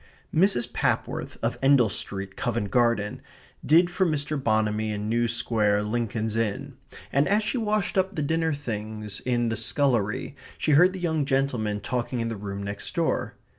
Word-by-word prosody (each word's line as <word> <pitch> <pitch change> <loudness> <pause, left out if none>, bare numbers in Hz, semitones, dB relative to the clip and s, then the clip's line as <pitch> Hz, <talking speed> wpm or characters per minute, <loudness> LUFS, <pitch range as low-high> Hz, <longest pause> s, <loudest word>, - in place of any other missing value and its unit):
Mrs. 165 -8 +2
Papworth, - - -1
of - - -1
Endell 135 -4 +5
Street, 95 -1 -4
Covent 115 -4 -2
Garden, 115 -4 +1 0.4
did 170 +4 +4
for 180 +2 +1
Mr. 155 -3 0
Bonamy 110 -1 +1
in 105 0 -3
New 120 +2 +1
Square, 110 -3 +1
Lincoln's 110 0 -2
Inn, 120 +6 -2 0.4
and 140 +2 +3
as 210 +2 +2
she 240 +4 -1
washed 210 -3 0
up 190 +1 0
the 150 - -1
dinner 160 +2 +1
things 110 -6 -4
in 120 -2 +1
the 110 - -1
scullery 120 0 0 0.2
she 155 - 0
heard 180 +6 +6
the 190 - -6
young 160 -4 0
gentlemen 130 -7 0
talking 125 +2 -2
in 115 0 -1
the 115 - -3
room 100 -1 -5
next 100 +1 -5
door. - - 0
120 Hz, 170 wpm, -26 LUFS, 110-150 Hz, 0.4 s, heard